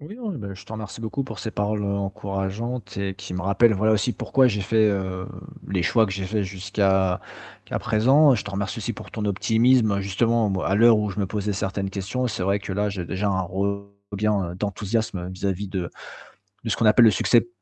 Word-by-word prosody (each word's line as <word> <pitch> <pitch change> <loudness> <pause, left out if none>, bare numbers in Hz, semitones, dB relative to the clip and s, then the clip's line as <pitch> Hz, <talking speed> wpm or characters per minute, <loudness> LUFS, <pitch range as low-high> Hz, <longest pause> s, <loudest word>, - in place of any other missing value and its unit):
Oui, 155 +9 -9
non, 230 -5 -4
ben, 100 - -6
je 95 0 -12
te - - -11
remercie 110 0 -7
beaucoup 115 +4 -3
pour 135 - -8
ces 110 - -5
paroles, 105 +1 -1
heu, 100 0 0
encourageantes 100 +3 -4
et 100 -1 -2
qui 95 -2 -8
me 90 - -3
rappellent, 110 +4 +4
voilà, 110 +3 +2
aussi 110 +4 +1
pourquoi 130 +1 +3
j'ai 105 -3 -1
fait, 110 +2 +3
heu, 95 -2 -2 0.4
les 95 -3 0
choix 110 +3 +4
que 105 - -4
j'ai 95 0 -3
faits 105 +2 -1
jusqu'à 95 -1 0 0.4
qu'à - - -3
présent. 135 +6 +4
Je 110 - -2
te 105 - -6
remercie 100 0 -3
aussi - - -3
pour - - -11
ton 110 - -3
optimisme 110 +1 +3
justement, 110 +3 +1
bon 95 -1 -1
à 95 - +1
l'heure 115 +1 +6
où 105 -1 -1
je 100 +2 -4
me 100 - 0
posais 105 0 -2
certaines 95 0 -2
questions, 100 +6 -2
c'est 115 -5 -3
vrai 100 +2 +1
que 100 -1 -6
là 105 +2 0
j'ai 95 -3 -4
déjà 95 +4 -2
un 95 -1 +1 0.7
regain 100 -3 0
d'enthousiasme 100 -1 -2
vis-à-vis 95 +1 -3
de 90 -2 -3 0.8
de - - -2
ce - - +1
qu'on - - 0
appelle 110 +3 +7
le 110 - +7
succès 115 +5 +3
100 Hz, 220 wpm, -24 LUFS, 95-110 Hz, 0.8 s, appelle